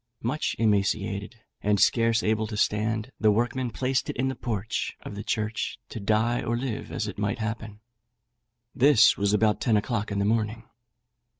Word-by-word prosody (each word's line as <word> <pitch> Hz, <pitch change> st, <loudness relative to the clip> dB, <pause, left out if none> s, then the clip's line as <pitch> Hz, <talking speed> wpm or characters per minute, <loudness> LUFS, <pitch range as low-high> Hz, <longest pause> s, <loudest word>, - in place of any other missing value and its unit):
Much 130 Hz, +7 st, -1 dB
emaciated, 100 Hz, 0 st, 0 dB, 0.2 s
and 105 Hz, 0 st, +2 dB
scarce 115 Hz, 0 st, +3 dB
able 110 Hz, 0 st, +1 dB
to 105 Hz, -1 st, -5 dB
stand, 110 Hz, +3 st, 0 dB
the 110 Hz, -, +4 dB
workmen 120 Hz, +4 st, +1 dB
placed 130 Hz, +3 st, -1 dB
it -, -, -3 dB
in 130 Hz, +1 st, 0 dB
the 130 Hz, -, -3 dB
porch 110 Hz, -3 st, -3 dB
of -, -, -8 dB
the 100 Hz, +1 st, -6 dB
church, 110 Hz, 0 st, -2 dB
to 115 Hz, -, -6 dB
die 110 Hz, +4 st, +1 dB
or 120 Hz, +1 st, -1 dB
live 125 Hz, -3 st, -4 dB
as 110 Hz, -, -2 dB
it 100 Hz, -, -6 dB
might 100 Hz, -1 st, -1 dB
happen. 110 Hz, -1 st, -5 dB, 0.9 s
This 130 Hz, -4 st, +6 dB
was 100 Hz, 0 st, +1 dB
about 105 Hz, 0 st, +2 dB
ten 115 Hz, -6 st, +3 dB
o'clock 105 Hz, 0 st, -2 dB
in 100 Hz, -, -2 dB
the 100 Hz, -, +1 dB
morning. 110 Hz, +1 st, 0 dB
110 Hz, 175 wpm, -26 LUFS, 105-115 Hz, 0.9 s, This